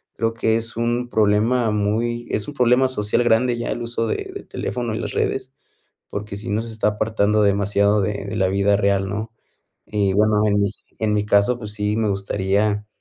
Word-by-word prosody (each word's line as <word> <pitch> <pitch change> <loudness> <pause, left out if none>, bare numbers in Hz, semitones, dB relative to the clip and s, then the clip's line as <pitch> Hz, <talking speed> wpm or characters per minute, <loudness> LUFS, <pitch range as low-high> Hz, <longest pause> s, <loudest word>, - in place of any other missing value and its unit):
creo 115 0 0
que 115 -1 +1
es 115 0 -5
un 120 +1 -1
problema 110 +2 +2
muy 115 +3 -1
es 105 - -1
un 145 - -6
problema 125 0 +3
social 115 -1 0
grande 120 +1 +2
ya 120 - -3
el 120 - -3
uso 115 -1 -2
de - - -3
del - - -9
teléfono 120 -3 -3
en - - -3
las - - -4
redes, 130 0 -2 0.6
porque 100 0 -5
si 110 +2 -6
nos 110 +3 -2
está 110 -1 0
apartando 105 0 +1
demasiado 100 +1 +2
de 100 0 -2
de 110 +2 -5
la 95 -2 +2
vida 100 +1 +2
real, 100 -1 +1
¿no? 110 +3 -4 0.5
Y 100 -2 0
bueno, 105 +1 +3
en 105 -1 +2
mi 100 - +1 0.3
en 110 -1 +1
mi 105 0 0
caso, 105 +4 +3
pues 105 -3 -7
sí, 105 0 -1
me 110 -1 +1
gustaría 100 +1 0
105 Hz, 200 wpm, -21 LUFS, 100-115 Hz, 0.6 s, problema